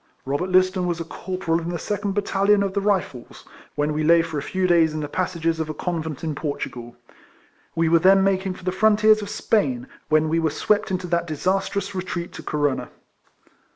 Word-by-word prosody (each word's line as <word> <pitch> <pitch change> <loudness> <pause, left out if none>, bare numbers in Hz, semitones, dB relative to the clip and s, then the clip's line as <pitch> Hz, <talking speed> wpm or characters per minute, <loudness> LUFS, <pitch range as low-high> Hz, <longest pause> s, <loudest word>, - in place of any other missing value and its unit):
Robert 145 +7 -2
Liston 185 0 +3
was 170 -1 -2
a - - -2
corporal 170 0 -2
in 170 0 -5
the 175 - -2
second 205 +3 -3
battalion 200 0 +2
of 195 -1 -2
the 200 - 0
Rifles, 185 -11 -2 0.3
when 150 +1 0
we 155 +1 -1
lay 165 +1 +5
for 160 -3 -4
a - - -5
few 185 +5 -2
days 165 -3 +3
in - - -2
the 145 - -3
passages 165 0 -1
of 160 -1 -2
a 155 - -4
convent 160 -4 -4
in 160 -2 -2
Portugal. 130 -5 -5 0.8
We 165 0 +2
were 165 +1 +5
then 190 +3 +5
making 190 -1 0
for 185 - -14
the 185 - 0
frontiers 215 +2 +4
of 205 - -6
Spain, 230 +3 0 0.2
when 155 0 +3
we 165 +1 +1
were 160 -1 +1
swept 210 +7 0
into 185 -1 -2
that 170 -1 -1
disastrous 195 +5 -1
retreat 180 -2 -4
to - - -8
Corunna. 145 -3 -1
175 Hz, 200 wpm, -23 LUFS, 160-195 Hz, 0.8 s, lay